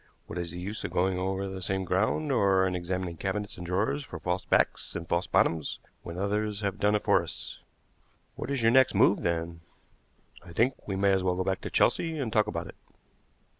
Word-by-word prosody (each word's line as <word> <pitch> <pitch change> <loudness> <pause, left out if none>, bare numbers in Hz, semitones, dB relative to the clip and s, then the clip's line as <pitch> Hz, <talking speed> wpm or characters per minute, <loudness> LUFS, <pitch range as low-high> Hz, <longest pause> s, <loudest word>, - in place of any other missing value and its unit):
What 90 - -6
is 85 -1 -3
the 90 +2 -7
use 100 +4 -5
of - - -2
going 90 +1 +1
over 95 +1 -1
the 95 -1 -6
same 95 +1 -1
ground, 110 - +1
or 100 -6 +4
in 95 - 0
examining 90 -1 -3
cabinets 100 +3 -3
and 90 - -7
drawers 100 +11 0
for 90 - -8
false 90 +3 -2
backs - - +1
and 85 -1 -5
false 85 +2 0
bottoms, 80 -3 +1 0.2
when 85 +1 -7
others 105 +2 -1
have 100 0 -2
done 105 0 +3
it 105 - 0
for - - +4
us?" - - -8 0.8
"What - - -5
is 140 -4 -1
your 115 - +5
next 130 +1 +5
move, 100 - +4
then?" 85 -1 -2 0.8
"I 85 - -12
think 125 +8 0
we 100 - -2
may 100 +1 +3
as 95 - +2
well 90 -1 +1
go 95 - -1
back 95 0 -1
to - - -5
Chelsea 165 -1 +2
and 125 -7 -2
talk 105 -1 +3
about 85 -5 -3
it." - - -11
95 Hz, 215 wpm, -29 LUFS, 90-105 Hz, 0.8 s, your